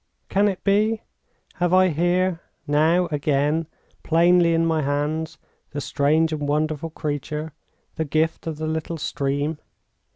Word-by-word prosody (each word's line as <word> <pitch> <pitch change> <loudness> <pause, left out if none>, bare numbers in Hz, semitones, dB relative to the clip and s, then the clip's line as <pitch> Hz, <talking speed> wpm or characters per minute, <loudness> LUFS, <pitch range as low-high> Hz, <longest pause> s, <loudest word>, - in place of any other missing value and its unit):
Can 200 +1 +3
it 195 -3 -3
be? 215 +2 +2 0.5
Have 175 +1 +2
I 185 0 +5
here, 175 +2 +1 0.2
now, 160 +5 +3
again, 150 +2 +1 0.3
plainly 170 0 +4
in 165 0 +2
my 160 -1 +1
hands, 150 +3 -2 0.4
the 145 - -3
strange 155 +3 +1
and 150 -2 -3
wonderful 155 +1 -1
creature, 150 0 -4 0.4
the 160 - -1
gift 160 +3 0
of 160 -2 -3
the 155 - -4
little 160 +1 -3
stream? 145 0 -2
160 Hz, 135 wpm, -23 LUFS, 150-170 Hz, 0.5 s, I